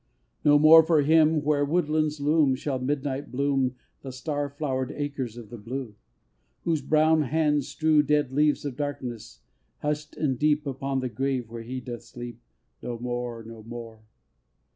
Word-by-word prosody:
III. - - +4
No 145 - +7
more 155 +2 +9
for 160 -2 +3
him, 155 0 +4
where 145 -1 +2
woodlands 155 -1 0
loom, 145 -2 +3
Shall 135 0 -3
Midnight 140 +1 -2
bloom 135 -1 0 0.3
The 135 - -7
star 145 +2 -3
flow'red 135 -3 -3
acres 140 -5 -4
of 115 -2 -10
the 120 - -8
blue! 120 +1 -5 0.7
Whose 160 -3 0
brown 155 +3 +3
hands 150 0 +1
strew 155 -1 +3
Dead 150 -2 +1
leaves 150 +1 +2
of 140 -3 -4
darkness, 125 - -5 0.4
hushed 150 0 -3
and 135 -5 0
deep, 150 0 +2
Upon 135 -1 -2
the 130 - -2
grave 130 -2 -2
where 115 0 -6
he 125 +3 -5
doth 120 -1 -7
sleep. 120 +1 -9 0.4
No 120 - -4
more! 120 -1 -4
no 115 0 -10
more! 115 -1 -9
140 Hz, 165 wpm, -26 LUFS, 125-150 Hz, 0.7 s, more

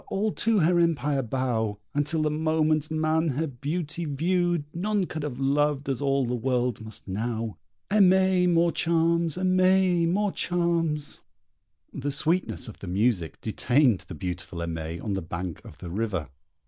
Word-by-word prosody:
all 210 +2 0
to 225 +1 +1
her 175 +2 +3
empire 150 -4 +1
bow! 115 -4 -1 0.2
And 145 0 0
till 160 -1 +1
the 150 - +1
moment 155 -1 +1
man 160 +1 +1
her 150 +2 0
beauty 155 +4 -4
viewed 175 +3 0
None 200 +2 0
could 160 -2 -5
have 145 -4 -4
loved 145 +1 +1
as 135 -1 -2
all 135 -1 +2
the 120 - -2
world 125 -1 0
must 110 -1 -11
now! 110 +2 -3 0.3
Aimée 190 -2 +4
more 170 0 +3
charms, 165 -1 +1
&c. 180 -3 +1 0.7
The 140 +1 -3
sweetness 155 -1 0
of 110 - -10
the 100 - -8
music 95 - 0
detained 120 0 +2
the 90 - -7
beautiful 90 +1 -5
Aimée 85 0 -4
on 105 - -2
the 95 - -2
bank 85 0 -5
of 75 - -12
the 85 +2 -8
river. 95 -6 -2
150 Hz, 150 wpm, -26 LUFS, 115-170 Hz, 0.7 s, Aimée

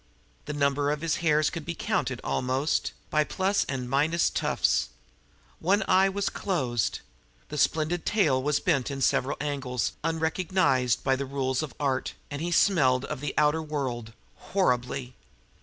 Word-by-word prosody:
The 150 - -4
number 140 0 +1
of 150 0 -1
his 165 -1 0
hairs 155 -2 +2
could 165 -3 -5
be 170 +2 -4
counted, - - -1
almost, 130 +4 0 0.2
by 155 0 +3
plus 190 +5 0
and 130 -2 -4
minus 150 +6 +2
tufts; - - +1 0.7
one 200 +6 +2
eye 190 +1 +5
was 200 +1 -2
closed; 130 - -1 0.5
his 150 -1 -1
splendid 160 +2 +1
tail 155 -12 +2
was 145 +1 +1
bent 145 -8 +1
in 140 -1 -4
several 130 +1 +1
angles 135 -4 -2
unrecognized 160 -5 +1
by 135 - +2
the 135 +1 -4
rules 130 -1 -1
of 150 -7 -6
art, 135 -3 -1 0.2
and 145 +1 -4
he 170 - -1
smelled 140 -8 +3
of 150 -3 -5
the 145 - -3
outer 150 +1 +3
world 130 -7 -4 0.2
horribly. 125 -7 -1
145 Hz, 155 wpm, -27 LUFS, 130-165 Hz, 0.7 s, eye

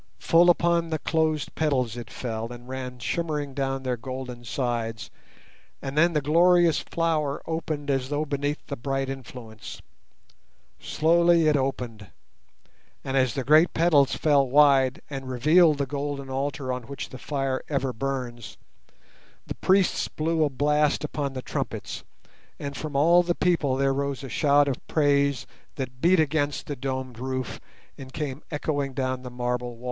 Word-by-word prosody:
Full 170 +2 +4
upon 170 -1 +2
the 160 - -1
closed 155 -1 0
petals 130 -7 0
it 120 -1 -7
fell 115 -1 -5
and 120 0 -10
ran 130 -1 -6
shimmering 150 +1 -2
down 135 -1 -2
their 125 -1 -1
golden 125 0 -7
sides, 115 -5 -3 0.7
and 135 0 -6
then 170 +3 +4
the 150 - +1
glorious 170 +2 +4
flower 155 -4 -1
opened 155 -3 -3
as 135 -1 -1
though 145 +1 -1
beneath 145 +1 -3
the 140 - -5
bright 135 +1 -2
influence. 120 -5 -8 1.0
Slowly 170 +1 +3
it 150 - +4
opened, 125 -6 -3 1.0
and 135 - -3
as 130 -3 +2
the 135 - -1
great 155 +6 +5
petals 160 -5 +4
fell 140 -4 +3
wide 135 -2 +4
and 135 -2 -6
revealed 155 +5 +4
the 140 - 0
golden 140 -1 -4
altar 135 -1 -2
on 125 -2 -6
which 140 - -6
the 130 - -10
fire 135 -2 -2
ever 135 -3 -1
burns, 125 -3 -4 0.9
the - - -5
priests 190 0 +2
blew 160 +1 0
a 150 - +2
blast 150 +2 +1
upon 145 -2 -3
the 130 -1 -6
trumpets, - - -4 0.5
and 140 0 -6
from 150 -1 -6
all 170 +5 +5
the 175 -1 -1
people 165 -7 +1
there 135 0 +2
rose 140 0 -2
a 135 - -6
shout 145 +3 +3
of 135 - -1
praise 140 -4 +2 0.3
that 130 -2 -6
beat 175 +1 +4
against 145 -2 0
the 145 - -4
domed 130 -2 -4
roof 130 -1 -4 0.4
and 130 -1 -10
came 145 -2 -4
echoing 145 -3 -2
down 130 -1 -1
the 125 - -7
marble 125 0 -3
walls. - - -19
140 Hz, 160 wpm, -26 LUFS, 130-155 Hz, 1.0 s, great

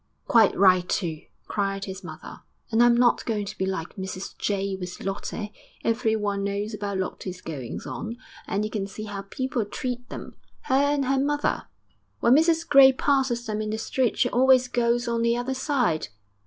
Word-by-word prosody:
'Quite 225 -4 +5
right 185 -2 +5
too!' 165 -5 -1 0.2
cried 195 -1 -2
his 190 0 -7
mother. - - -9 0.3
'And 225 +1 +3
I'm 240 0 +6
not 240 0 +3
going 210 -3 -2
to - - -7
be 190 - -2
like 190 -2 -4
Mrs 190 0 -6
Jay 195 -1 -1
with 180 -1 -7
Lottie. 205 +2 -4 0.3
Everyone 220 -4 0
knows 200 +2 -2
about 205 -2 -3
Lottie's 185 0 -4
goings 140 -9 -6
on, 230 +1 -5 0.3
and 205 +2 -1
you 215 - -5
can 200 -3 -2
see 215 +2 -8
how 205 -2 -5
people 245 +4 -2
treat 245 +4 -5
them - - -8 0.3
her - - -3
and 285 +1 +3
her 270 +1 +2
mother. 290 +1 0 0.5
When 235 - +5
Mrs 325 +3 +3
Gray 275 -2 +8
passes 260 -3 +1
them 215 -2 -2
in 215 - -3
the 215 - -2
street 245 +2 0
she - - +3
always 255 0 +5
goes 240 -1 +1
on 235 -1 0
the 235 0 +2
other 245 +2 -2
side. 260 - 0
220 Hz, 180 wpm, -25 LUFS, 195-250 Hz, 0.5 s, Gray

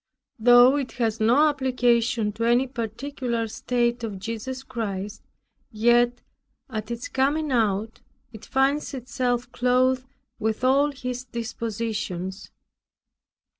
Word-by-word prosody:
Though 245 +4 +7
it 275 -3 -3
has 225 -2 -1
no 245 +8 +5
application 245 -5 +1
to 220 +2 -4
any 240 +3 +3
particular 240 0 -3
state 240 +1 -1
of 210 -4 -4
Jesus 230 +6 -5
Christ; 210 -6 -5 0.5
yet, 240 +2 +3 0.5
at 215 -1 -4
its 235 0 -4
coming 285 +3 0
out, 220 -2 0 0.3
it 220 - -11
finds 275 +2 0
itself 245 -1 -2
clothed 255 +1 +2 0.3
with 220 +2 -2
all 275 +3 +4
His 250 -2 -5
dispositions. 220 -5 -4
240 Hz, 110 wpm, -25 LUFS, 225-255 Hz, 0.5 s, Though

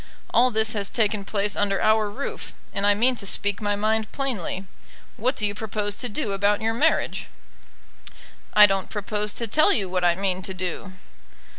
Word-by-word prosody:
All 250 +2 +5
this 220 -1 +3
has 200 -2 0
taken 210 -3 0
place 205 0 -1
under 200 -1 0
our 215 -1 +2
roof, 265 +7 -6 0.2
and 200 +1 +1
I 205 - +4
mean 250 +5 +4
to 200 - -5
speak 205 +2 0
my 205 -1 0
mind 215 +1 -1
plainly. 215 - -3 0.5
What 255 +5 -1
do 215 - 0
you 205 - -1
propose 205 -1 -3
to 245 - -1
do 210 -1 -3
about 200 +1 +1
your 225 +1 -1
marriage?" 310 +8 0 1.3
"I 210 0 +10
don't 195 -2 -1
propose 210 0 -2
to 235 - -1
tell 310 - +4
you 200 - +1
what 180 0 -2
I 175 -1 +3
mean 190 -1 -1
to 190 0 -4
do." 185 +1 -5
210 Hz, 185 wpm, -24 LUFS, 200-220 Hz, 1.3 s, I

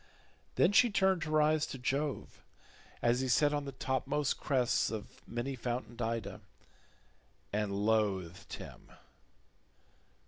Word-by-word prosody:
Then 180 - +4
she 245 +3 +6
turned 190 -5 +2
her 155 0 +2
eyes 155 0 +3
to - - -6
Jove 135 +3 -2 0.6
as 120 +1 +3
he 130 - -1
sat 145 +4 +3
on 145 -1 -1
the 140 - -5
topmost 135 +2 -1
crests 130 -4 +1
of 110 -2 -7
many 120 +3 -3
fountained 120 -1 -4
Ida, 115 0 -3 1.1
and 105 -1 -1
loathed 100 -4 0
him. - - -10
130 Hz, 125 wpm, -33 LUFS, 115-150 Hz, 1.1 s, she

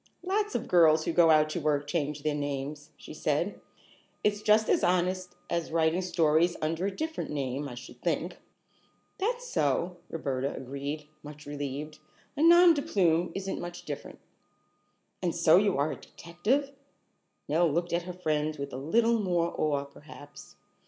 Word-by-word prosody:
"Lots 415 +3 -1
of - - -2
girls 160 -3 +5
who 170 - -1
go 170 -1 +5
out 155 -1 +5
to 175 - -2
work 145 -1 +1
change 150 -1 -2
their 155 - +1
names," 145 +1 -4
she - - -11
said. 155 +5 -1 0.6
"It's 205 0 +1
just 215 +1 +4
as - - +2
honest 180 0 0
as 170 -1 -2
writing 165 +2 +2
stories 170 -1 +2
under 165 +4 -1
a 200 - -4
different 320 0 -4
name, 140 0 -3
I 120 - -8
should 125 0 -11
think." 170 +1 -2 0.8
"That's 480 +5 -1
so," 170 - 0
Roberta 140 -4 -2
agreed, 140 +3 -5
much 150 0 -11
relieved. 145 +1 -5 0.4
"A 290 - -2
nom 345 +1 +8
de 290 - -1
plume 180 - +1
isn't 195 0 -3
much 175 0 -7
different." 145 -2 -7 1.0
"And 175 -3 -1
so 170 -1 +5
you 200 -3 +2
are 145 +2 +1
a - - -4
detective?" 215 +12 -2 0.8
Nell 160 +2 +2
looked 170 +3 -1
at 170 - +1
her - - -4
friend 155 -3 -1
with 140 0 -6
a - - -4
little 225 - +2
more 175 -4 0
awe, 145 -2 0
perhaps. 145 0 -13
165 Hz, 165 wpm, -29 LUFS, 145-185 Hz, 1.0 s, nom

